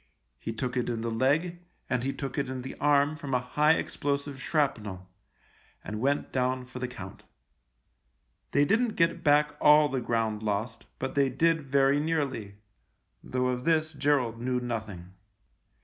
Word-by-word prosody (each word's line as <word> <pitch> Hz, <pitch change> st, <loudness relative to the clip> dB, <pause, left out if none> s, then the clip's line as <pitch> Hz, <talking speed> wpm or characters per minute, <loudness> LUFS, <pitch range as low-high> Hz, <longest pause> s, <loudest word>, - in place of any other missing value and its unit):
He 115 Hz, -, -4 dB
took 125 Hz, +2 st, -3 dB
it 125 Hz, -, 0 dB
in 115 Hz, -2 st, -2 dB
the 115 Hz, 0 st, -2 dB
leg, 150 Hz, +9 st, +1 dB, 0.3 s
and 125 Hz, -1 st, -1 dB
he 135 Hz, -, 0 dB
took 135 Hz, -2 st, -5 dB
it 140 Hz, -, -2 dB
in 130 Hz, -1 st, -5 dB
the 130 Hz, -, -6 dB
arm 145 Hz, +1 st, +3 dB
from 145 Hz, -4 st, -3 dB
a -, -, +3 dB
high 150 Hz, +5 st, +3 dB
explosive 140 Hz, -3 st, -2 dB
shrapnel, 105 Hz, -, -1 dB, 0.8 s
and 105 Hz, +1 st, -5 dB
went 140 Hz, +3 st, 0 dB
down 130 Hz, 0 st, 0 dB
for 125 Hz, 0 st, -9 dB
the 125 Hz, -, -2 dB
count. 125 Hz, -, -9 dB, 1.3 s
They 145 Hz, 0 st, +3 dB
didn't 220 Hz, +6 st, +1 dB
get 165 Hz, 0 st, +1 dB
back 150 Hz, 0 st, +3 dB
all 150 Hz, 0 st, +6 dB
the 130 Hz, -2 st, -2 dB
ground 115 Hz, -2 st, -1 dB
lost, 110 Hz, +2 st, -3 dB
but 130 Hz, 0 st, -3 dB
they 140 Hz, -1 st, +3 dB
did 160 Hz, +5 st, +2 dB
very 140 Hz, +1 st, +4 dB
nearly 140 Hz, -10 st, -2 dB, 0.4 s
— -, -, -46 dB
though 125 Hz, 0 st, -1 dB
of 125 Hz, 0 st, -2 dB
this 160 Hz, 0 st, +1 dB
Gerald 140 Hz, -5 st, +1 dB
knew 125 Hz, 0 st, 0 dB
nothing. 110 Hz, -7 st, -5 dB
130 Hz, 165 wpm, -28 LUFS, 120-145 Hz, 1.3 s, all